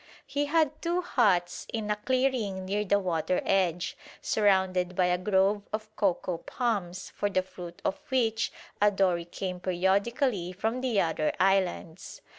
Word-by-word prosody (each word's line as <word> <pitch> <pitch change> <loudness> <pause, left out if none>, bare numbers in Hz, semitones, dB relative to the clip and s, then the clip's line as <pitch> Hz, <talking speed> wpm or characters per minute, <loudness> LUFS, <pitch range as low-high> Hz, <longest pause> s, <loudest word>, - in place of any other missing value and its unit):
He 285 +1 -1
had 315 -1 +1
two 345 +1 0
huts 190 - +1
in 215 -2 -2
a - - +2
clearing 230 -5 0
near 205 +2 0
the 200 0 +3
water 180 -2 0
edge, 180 -3 +1 0.2
surrounded 190 -3 +2
by 180 - +3
a 180 0 +2
grove 195 +2 +2
of 215 0 -5
cocoa 180 -3 0
palms 200 -7 -3
for 205 - -1
the 185 -2 +1
fruit 175 -2 -10
of 190 - 0
which 230 -4 +1 0.3
a 210 - +6
dory 185 -4 +1
came 180 +1 -5
periodically 190 +2 0
from 220 +7 -2
the 245 -6 +1
other 160 -3 +1
islands. 185 -3 0
195 Hz, 150 wpm, -28 LUFS, 180-220 Hz, 0.3 s, a